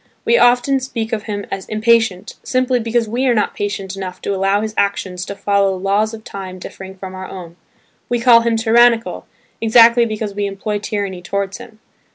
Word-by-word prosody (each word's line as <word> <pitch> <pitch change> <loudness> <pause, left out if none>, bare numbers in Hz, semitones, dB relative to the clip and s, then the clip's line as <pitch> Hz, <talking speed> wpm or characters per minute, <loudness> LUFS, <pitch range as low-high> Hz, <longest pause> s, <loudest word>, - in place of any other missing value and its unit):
We 470 - +4
often 250 - +4
speak 235 -3 -4
of 215 -2 -2
him 205 -2 -4
as 195 -1 -5
"impatient" 220 -3 +1
simply 255 -1 0
because 230 0 0
we 245 +5 -1
are 245 - +3
not 210 - 0
patient 195 -2 -4
enough 185 -2 -6
to 200 - -1
allow 195 +1 +1
his 215 0 -4
actions 190 -3 -1
to 200 - -6
follow 200 -1 +1
laws 200 +3 0
of 220 -1 -9
time 190 -3 -8
differing 190 +1 -10
from 190 0 -8
our 185 0 -7
own; 175 -3 -9 0.5
we 240 - 0
call 235 -1 +7
him 230 0 +1
"tyrannical" 230 +1 +3 0.3
exactly 235 +1 +6
because 215 -2 -4
we 205 0 -2
employ 205 +1 -3
tyranny 200 -3 -4
towards 195 +2 -3
him. 215 - -13
210 Hz, 190 wpm, -18 LUFS, 195-230 Hz, 0.5 s, call